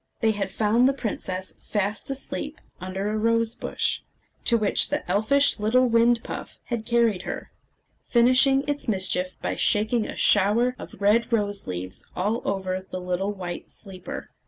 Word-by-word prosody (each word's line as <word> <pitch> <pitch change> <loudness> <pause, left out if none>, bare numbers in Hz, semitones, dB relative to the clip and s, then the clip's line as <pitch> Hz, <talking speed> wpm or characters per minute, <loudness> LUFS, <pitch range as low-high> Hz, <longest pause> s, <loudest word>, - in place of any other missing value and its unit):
They 225 -1 +3
had 200 -2 -2
found 225 +6 +3
the - - +1
princess 190 -7 -4
fast 205 +2 -2
asleep 280 +2 -4 0.2
under 185 +2 -4
a - - -2
rose 230 +1 +2
bush, 245 - -1 0.4
to 235 - +4
which 210 -2 +2
the 290 +1 -2
elfish 280 +6 +3
little 250 +5 +3
wind 230 0 +4
puff - - -7
had 235 -2 -4
carried 235 -5 +2
her, - - -6 0.6
finishing 255 +3 +4
its 290 -2 -2
mischief 185 -3 +1
by - - -1
shaking 215 +2 +2
a - - -6
shower 215 +5 +4
of - - -10
red 215 +4 +3
rose 205 -3 0
leaves 90 +1 -5
all 210 +6 0
over 190 -1 -2
the 185 - -4
little 180 +2 -2
white 180 -3 -6
sleeper. 190 -3 -7
215 Hz, 160 wpm, -25 LUFS, 190-235 Hz, 0.6 s, to